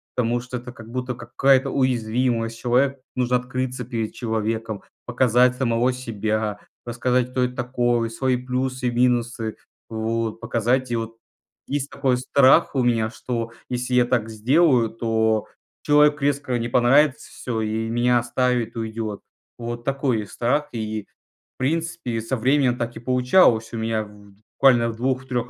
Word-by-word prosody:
потому 120 0 +1
что 125 +1 -6
это 125 +1 -9
как 110 -1 -13
будто 125 0 -3
какая-то 130 +3 +2
уязвимость, 120 -2 0
человек 130 +4 +1 0.2
нужно 125 0 +1
открыться 125 0 -4
перед 115 -3 -3
человеком, 110 -2 -3 0.2
показать 125 0 +3
самого 125 -1 +1
себя, 110 -3 -2 0.3
рассказать, 125 +1 0
кто 125 0 0
это 125 0 -2
такое, 120 -2 0
свои 125 +2 0
плюсы 130 0 -2
и - - +1
минусы, 120 -2 0 0.3
вот. 115 0 -2
Показать, 120 +3 0
и - - +1
вот 115 0 -4 0.5
есть 140 0 -2
такой 135 -3 0
страх 130 +2 +4
у 130 - +2
меня, 115 -2 +1
что 115 0 -4 0.2
если 125 0 -3
я 125 -1 +5
так 120 -3 0
сделаю, 125 +2 +3
то 110 -1 0 0.3
человеку 150 0 +4
резко 140 -3 0
не 115 - -2
понравится, 135 +5 +3
всё, 115 -3 -4
и 110 +1 -2
меня 120 +1 +2
оставит, 120 -1 -1
уйдёт. 110 -2 -4 0.4
Вот 120 0 -5
такой 135 -6 0
страх. 140 +8 0
И, 110 -2 -3 0.5
в - - -
принципе, 160 -3 -2
со 115 +4 -2
временем 130 +1 +2
так 120 -1 -4
и - - -6
получалось. 125 -1 +3
У - - -3
меня 110 -1 -1 0.5
буквально 120 -4 +5
в 115 - -5
2-3 130 -1 -2
120 Hz, 150 wpm, -23 LUFS, 115-130 Hz, 0.5 s, я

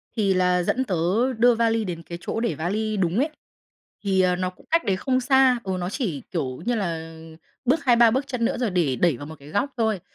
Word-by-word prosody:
Thì 200 -4 +2
là 180 -1 +2
dẫn 260 +8 0
tớ 185 -9 -2 0.4
đưa 240 +1 +5
vali 225 -1 +1
đến 170 -2 -5
cái 170 +1 -7
chỗ - - -3
để 230 -9 -1
vali 210 +7 -2
đúng 180 0 0
ấy, 290 +4 +1 0.8
thì, 190 -2 +2
ờ, 180 -1 +3
nó 185 0 -2
cũng 185 - -22
cách 330 +1 +2
đấy 195 -3 +1
không 255 +5 0
xa. 265 -1 +4
Ừ, 190 -1 -2
nó 175 - -2
chỉ, 195 - -3
kiểu, 140 -3 -3
như 245 - +1
là 165 -5 -3 0.5
bước 280 +6 +1
2-3 235 -2 +6
bước 265 +4 -1
chân 250 -4 -2
nữa, - - 0
rồi 240 -5 0
để 160 -8 +1
đẩy 170 -7 +2
vào 145 - -8
một 160 - -9
cái 140 +1 -14
góc 240 - -1
thôi, 220 -5 0
200 Hz, 235 wpm, -24 LUFS, 175-240 Hz, 0.8 s, 2-3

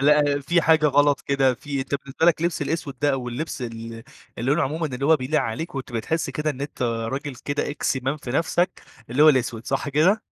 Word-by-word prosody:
لأ، 145 0 +4
في 170 +5 +2
حاجة 160 -1 +4
غلط 145 -1 +3
كده 135 -2 +2
في 140 +2 -4
أنت 135 +1 -3
بالنسبة 140 +3 -1
لك 165 -1 +4
لبس 170 -3 0
الأسود 145 -3 -3
ده 145 - +3
أو 125 -2 -2
اللبس 130 +3 -4
ال 120 - -2 0.7
اللي 120 +4 0
لونه 155 +3 +3
عمومًا 160 +4 -1
اللي 135 0 -3
هو 160 0 +6
بيليق 135 +3 0
عليك، 140 +9 -4
وبتبقى 130 -3 -3
بتحس 160 +8 -2
كده 150 0 -1
إن 140 -2 -7
أنت 140 -2 -5
راجل 125 +4 -2
كده 145 0 -1
إكس 140 - -1
مان 135 +3 -1
في 135 -4 -8
نفسك، 175 +6 0 0.3
اللي 130 +5 +3
هو 155 - +9
الأسود. 120 -4 +1
صح 135 +1 -1
كده؟ 165 +10 +3
140 Hz, 220 wpm, -24 LUFS, 130-155 Hz, 0.7 s, هو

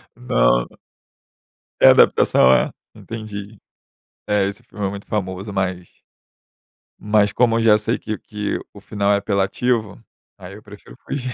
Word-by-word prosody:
Não, - - +1
não. - - -22 1.0
É - - +8
adaptação, 65 - +5
é? - - +2 0.2
Entendi. 110 -1 -8 0.7
É, 105 -2 +2
esse 105 +5 -7
filme 105 -3 -6
é 95 - 0
muito 100 0 -9
famoso, 95 0 -4
mas 90 -2 -2 1.1
mas 105 0 +2
como 115 -2 +2
eu 115 - 0
já 105 -2 +5
sei 105 - -1
que 110 -1 -5
que 105 -1 -4
o 100 - -12
final 100 -1 -1
é - - +3
apelativo, 100 +3 -1 0.4
aí 95 +1 -11
eu 105 - -14
prefiro 105 - -14
fugir. 130 -3 -4
105 Hz, 150 wpm, -20 LUFS, 95-110 Hz, 1.1 s, É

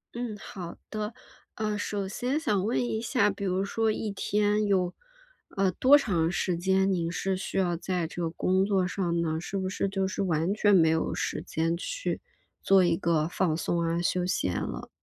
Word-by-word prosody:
嗯， 235 -3 -4
好 180 -4 -8
的。 215 0 -4 0.4
呃， 210 -1 -1
首 205 -1 -2
先 250 +8 -1
想 210 - 0
问 230 - 0
一 220 -2 -1
下， 225 -3 +2
比 200 0 -4
如 185 +1 0
说 220 +2 0
一 215 0 -3
天 210 +1 +1
有， 185 -3 +1 0.6
呃， 195 -1 +2
多 270 +8 +6
长 175 - +1
时 175 0 -1
间， 190 +2 +2
您 170 -3 0
是 185 +2 -1
需 190 - -4
要 175 -3 +1
在 180 -1 -2
这 175 - -6
个 165 - 0
工 185 +3 +1
作 195 -3 +2
上 175 -2 -1
呢？ 160 -1 -1
是 195 +3 -4
不 190 -1 -1
是 195 +1 -1
就 195 0 -1
是 190 - -3
完 170 +1 +1
全 205 -1 +4
没 160 -3 +5
有 160 0 0
时 - - -2
间 165 +1 -1
去 - - -3 0.4
做 195 -1 +5
一 170 -1 +2
个 160 -2 +1
放 180 -3 0
松 170 +1 -1
啊 165 +1 0
休 180 0 0
闲 90 - -1
了。 - - -5
190 Hz, 210 characters per minute, -28 LUFS, 170-205 Hz, 0.6 s, 多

